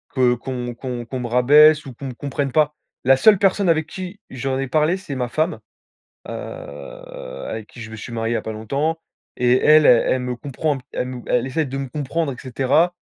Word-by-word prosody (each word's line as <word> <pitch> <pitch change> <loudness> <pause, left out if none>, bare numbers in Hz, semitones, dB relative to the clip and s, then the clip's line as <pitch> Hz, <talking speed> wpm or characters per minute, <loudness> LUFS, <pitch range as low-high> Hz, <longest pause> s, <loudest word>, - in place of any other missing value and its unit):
que 125 -2 +4
qu'on 125 0 -5
qu'on 120 -1 -5
qu'on 130 +2 -5
me 120 - -3
rabaisse 145 +6 +6
ou 130 - -8
qu'on 135 +3 -7
me 130 - -5
comprenne 140 +1 -3
pas. 150 0 +2 0.3
La 135 +1 +5
seule 210 +7 +6
personne 195 0 +2
avec 160 -1 +2
qui 185 +2 -7
j'en 130 +1 -2
ai 135 - -2
parlé, 155 +6 +2
c'est 165 -8 -7
ma 125 -2 -1
femme, 155 +7 -1 0.7
heu, - - -4
avec - - -8
qui 120 - -12
je 110 0 -8
me - - -7
suis 120 - -8
marié 115 0 -1
il - - 0
y - - +2
a - - -3
pas 110 - -4
longtemps 140 +9 -2 0.4
et 125 0 +4
elle, 155 0 +7
elle 125 +1 +4
me 125 -1 -3
comprend 145 +3 -2
un - - -9
elle 125 - -2
me 125 -1 -6
elle 125 0 +1
essaie 155 +4 -1
de 135 0 -5
me 135 -1 -4
comprendre, 150 +1 -2
et 125 - -12
cetera. 135 +7 +1
135 Hz, 225 wpm, -21 LUFS, 125-155 Hz, 0.7 s, elle